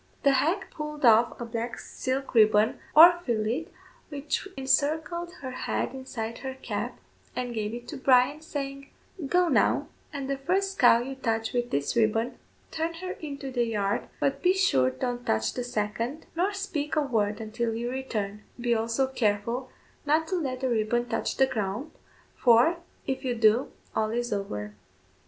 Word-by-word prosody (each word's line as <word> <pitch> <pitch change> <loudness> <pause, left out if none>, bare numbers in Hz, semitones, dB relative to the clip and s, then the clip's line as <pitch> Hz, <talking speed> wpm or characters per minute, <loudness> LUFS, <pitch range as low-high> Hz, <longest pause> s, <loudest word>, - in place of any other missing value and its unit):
The 280 - +6
hag 330 +9 +1
pulled 300 -2 -4
off 230 0 +5
a 240 - -4
black 230 +1 -4
silk 265 +1 -4
ribbon 215 -1 +4 0.2
or 345 +3 +9
fillet 235 +6 -1 0.4
which 290 +5 -3
encircled 315 +6 0
her 260 - -4
head 255 - -2
inside 230 -4 -5
her 265 -1 -5
cap, 265 - -4 0.4
and 245 -1 -3
gave 215 -2 -2
it 240 0 -9
to 300 - -5
Bryan, 265 +3 +4
saying 275 -3 -5 0.4
"Go, 360 +4 +3
now, - - +2 0.2
and 280 -3 -4
the 275 0 -2
first 385 +6 0
cow 240 -2 +7
you 270 +2 -5
touch 225 -4 -2
with 245 -1 0
this 140 0 -1
ribbon, 225 +2 +1 0.3
turn 325 +1 -2
her 370 +2 -5
into 280 -5 -6
the 240 -2 +1
yard, 205 -3 -1
but 275 0 0
be 365 +4 +4
sure 130 - +3
don't 245 - -3
touch 110 - 0
the 250 - -3
second, 230 +5 -3
nor 365 +4 +1
speak 360 -8 -3
a 305 - +3
word 215 -7 0
until 225 +1 -2
you 240 +2 -3
return; 210 -6 -3 0.2
be 240 0 +1
also 230 +3 +1
careful 235 0 -1 0.3
not 310 +2 +2
to 375 - 0
let 265 -7 -2
the 260 - 0
ribbon 240 +1 +1
touch - - -2
the 265 - +6
ground, 225 +2 -3 0.4
for, 245 +8 +5 0.3
if 265 - -2
you 250 -2 -1
do, 225 +2 +3 0.2
all 215 0 +1
is 240 0 -1
over." 105 - -4
250 Hz, 170 wpm, -27 LUFS, 225-285 Hz, 0.4 s, or